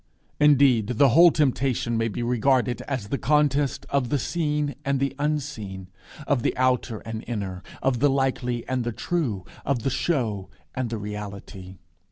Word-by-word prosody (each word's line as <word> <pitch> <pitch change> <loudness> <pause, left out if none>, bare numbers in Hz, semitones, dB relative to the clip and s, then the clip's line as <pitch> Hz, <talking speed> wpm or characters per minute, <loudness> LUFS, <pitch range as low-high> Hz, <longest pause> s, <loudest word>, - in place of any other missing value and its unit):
Indeed, 135 -6 +4
the 140 +1 +6
whole 170 +9 +7
Temptation 130 -5 0
may 115 0 +1
be 115 +2 -4
regarded 125 +1 +1
as 130 -8 -3
the 140 - -2
contest 145 -2 +1
of 140 -4 +1
the 145 - +1
seen 150 0 -1
and 140 -1 0
the 140 0 -1
unseen, 135 -11 -3 0.4
of 140 -5 +1
the - - -1
outer 125 -3 +1
and 110 -1 -6
inner, 100 -6 -4 0.2
of 130 -2 +1
the 145 +3 +4
likely 130 -3 -1
and 130 -1 -1
the 120 0 -3
true, 120 - -2 0.2
of 130 -4 -1
the 135 - 0
show 115 - -1 0.2
and 130 -3 -2
the 115 - -3
reality. 100 -2 -7
125 Hz, 165 wpm, -25 LUFS, 110-140 Hz, 0.4 s, whole